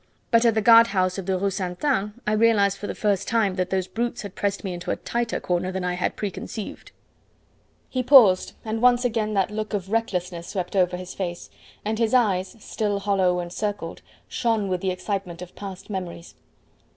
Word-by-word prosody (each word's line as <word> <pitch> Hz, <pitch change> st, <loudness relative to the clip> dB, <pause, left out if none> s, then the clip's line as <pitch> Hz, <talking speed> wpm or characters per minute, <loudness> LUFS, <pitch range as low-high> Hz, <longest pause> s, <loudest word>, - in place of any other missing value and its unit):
But 230 Hz, 0 st, +5 dB
at 230 Hz, -2 st, +4 dB
the 220 Hz, -, +1 dB
guard 230 Hz, +1 st, +8 dB
house 185 Hz, -2 st, 0 dB
of 190 Hz, -, -7 dB
the 190 Hz, -1 st, +1 dB
Rue 200 Hz, +1 st, 0 dB
Ste. 180 Hz, +1 st, -4 dB
Anne 210 Hz, -5 st, 0 dB
I 210 Hz, -, +1 dB
realised 210 Hz, -3 st, +3 dB
for 205 Hz, -, -5 dB
the -, -, -4 dB
first 200 Hz, -2 st, 0 dB
time 220 Hz, -4 st, +2 dB
that 185 Hz, -1 st, -2 dB
those 190 Hz, -1 st, 0 dB
brutes 240 Hz, +3 st, -3 dB
had 200 Hz, -2 st, -7 dB
pressed 200 Hz, -1 st, -2 dB
me 190 Hz, -2 st, -3 dB
into 175 Hz, 0 st, -6 dB
a -, -, +1 dB
tighter 235 Hz, -1 st, -2 dB
corner 180 Hz, +1 st, -1 dB
than 190 Hz, -1 st, -3 dB
I 180 Hz, 0 st, 0 dB
had 180 Hz, -, -1 dB
pre 205 Hz, -2 st, -3 dB
conceived." 215 Hz, +2 st, -7 dB, 1.0 s
He 255 Hz, -, -2 dB
paused, 235 Hz, -9 st, +6 dB
and 220 Hz, 0 st, -2 dB
once 250 Hz, 0 st, +4 dB
again 215 Hz, -3 st, 0 dB
that 195 Hz, 0 st, +1 dB
look 215 Hz, 0 st, -3 dB
of 195 Hz, -1 st, -4 dB
recklessness 180 Hz, -6 st, -2 dB
swept 185 Hz, -1 st, -4 dB
over 180 Hz, -1 st, +2 dB
his 185 Hz, 0 st, -8 dB
face, 175 Hz, -3 st, -5 dB, 0.3 s
and 215 Hz, +1 st, -1 dB
his 230 Hz, +1 st, +2 dB
eyes 195 Hz, -5 st, +2 dB
still 210 Hz, -1 st, -2 dB
hollow 195 Hz, -3 st, +1 dB
and 175 Hz, 0 st, -5 dB
circled 205 Hz, -6 st, -4 dB, 0.3 s
shone 225 Hz, -4 st, 0 dB
with 180 Hz, -1 st, -1 dB
the 190 Hz, -, 0 dB
excitement 185 Hz, -1 st, -3 dB
of 180 Hz, -, -13 dB
past 195 Hz, -1 st, -8 dB
memories. 180 Hz, -4 st, -6 dB
200 Hz, 205 wpm, -24 LUFS, 185-220 Hz, 1.0 s, guard